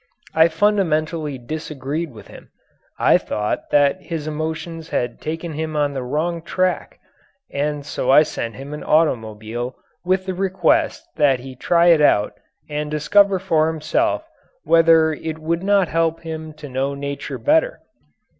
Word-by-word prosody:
I 160 +1 +6
fundamentally 160 -5 0
disagreed 150 +3 -5
with 110 -3 -13
him. - - -14 0.5
I - - +4
thought 105 0 -3
that 145 +5 +3
his 165 -5 -5
emotions 160 +1 -4
had 120 -1 -2
taken 160 +1 -4
him 155 +1 -4
on 145 -1 +1
the 135 - -3
wrong 155 +7 -2
tack 185 +2 -1 0.6
and 145 0 -2
so 145 -2 -3
I 145 +3 +7
sent 115 -6 -5
him 140 +2 -8
an 150 - -6
automobile 120 -5 0 0.3
with 185 +1 +1
the 190 - -2
request 185 -2 +1
that 135 -4 +3
he 130 0 -9
try 170 +6 +3
it 165 -3 +5
out 105 -8 +3 0.3
and 150 0 -3
discover 195 +6 +3
for 160 -4 +1
himself 160 - -1 0.4
whether 165 -1 +5
it 160 +1 -5
would 165 +2 -2
not 200 -1 +3
help 165 0 0
him 160 -1 -6
to 150 -1 -10
know 135 +1 -2
nature 140 0 -5
better. 320 +12 +1
155 Hz, 150 wpm, -21 LUFS, 140-170 Hz, 0.6 s, I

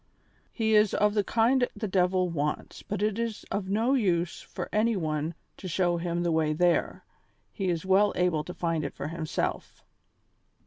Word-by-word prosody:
He 220 -2 0
is 210 -1 +4
of 210 0 +3
the 210 -1 +2
kind 245 +4 +2
the 215 - -3
devil 185 -1 +2
wants, 150 -3 -3
but 205 0 -3
it 215 +1 0
is 230 -2 -3
of 195 -2 -2
no 225 +6 +2
use 180 -9 +1
for - - -6
any 225 +2 +2
one 155 -2 -2 0.2
to 190 - -7
show 175 0 +1
him 170 0 -2
the 170 - +1
way 160 -1 +2
there, 175 +2 +1 0.5
he 195 -3 -2
is 170 0 -2
well 195 +2 +4
able 180 -4 +1
to 180 - -6
find 165 -3 -1
it 140 - -5
for 145 - -5
himself. 165 -1 -3
185 Hz, 180 wpm, -28 LUFS, 170-210 Hz, 0.5 s, is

